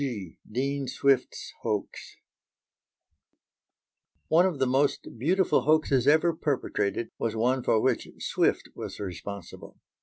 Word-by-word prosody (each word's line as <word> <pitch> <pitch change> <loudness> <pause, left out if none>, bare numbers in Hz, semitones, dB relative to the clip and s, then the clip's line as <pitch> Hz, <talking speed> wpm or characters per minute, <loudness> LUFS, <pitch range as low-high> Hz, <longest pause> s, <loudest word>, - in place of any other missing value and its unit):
G. 105 -11 -4
DEAN 135 +3 -1
SWIFT'S 130 0 0
HOAX 105 -2 -4 2.1
One 170 +4 +5
of 175 -6 -3
the 135 - +2
most 130 -2 0
beautiful 180 +8 +2
hoaxes 145 -4 +2
ever 160 +3 +4
perpetrated 120 -8 -2
was 115 -1 -1
one 125 +4 +1
for 110 - +2
which 125 0 0
Swift - - 0
was - - -7
responsible. 100 0 -8
130 Hz, 115 wpm, -27 LUFS, 110-145 Hz, 2.1 s, One